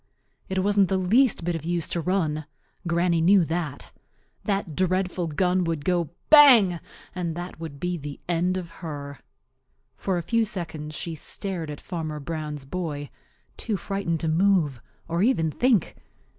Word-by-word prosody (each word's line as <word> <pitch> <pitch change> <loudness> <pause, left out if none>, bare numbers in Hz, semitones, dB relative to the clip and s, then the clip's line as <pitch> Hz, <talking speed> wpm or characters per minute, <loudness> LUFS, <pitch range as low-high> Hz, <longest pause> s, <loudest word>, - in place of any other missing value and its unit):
It 190 0 0
wasn't 200 -1 +4
the 190 - +2
least 210 +3 +3
bit 175 - 0
of 165 - -5
use 170 0 -1
to 170 - -1
run. 155 -4 -1 0.4
Granny 170 0 +2
knew 185 +1 +5
that. 160 -4 -4 0.5
That 195 -7 -1
dreadful 185 -1 0
gun 180 +4 +1
would 165 -3 -2
go 175 -4 +1 0.2
"bang!" 240 - +8 0.3
and 175 -3 -3
that 175 -1 -7
would 155 -4 -7
be 180 +2 -2
the 145 -1 -7
end 175 +2 +1
of 175 -2 -6
her. 140 -3 -6 0.8
For 190 -2 -1
a 170 - -2
few 230 +5 +2
seconds 160 -7 -5
she 170 - -4
stared 170 +1 -5
at 150 - -6
Farmer 160 -4 -5
Brown's 150 -1 -5
boy, 145 -2 -4 0.5
too 215 -4 -2
frightened 190 -3 -2
to 165 - -1
move 160 - +2 0.3
or 170 +1 -1
even 190 -9 +2
think. 245 - +2
175 Hz, 155 wpm, -25 LUFS, 155-190 Hz, 0.8 s, bang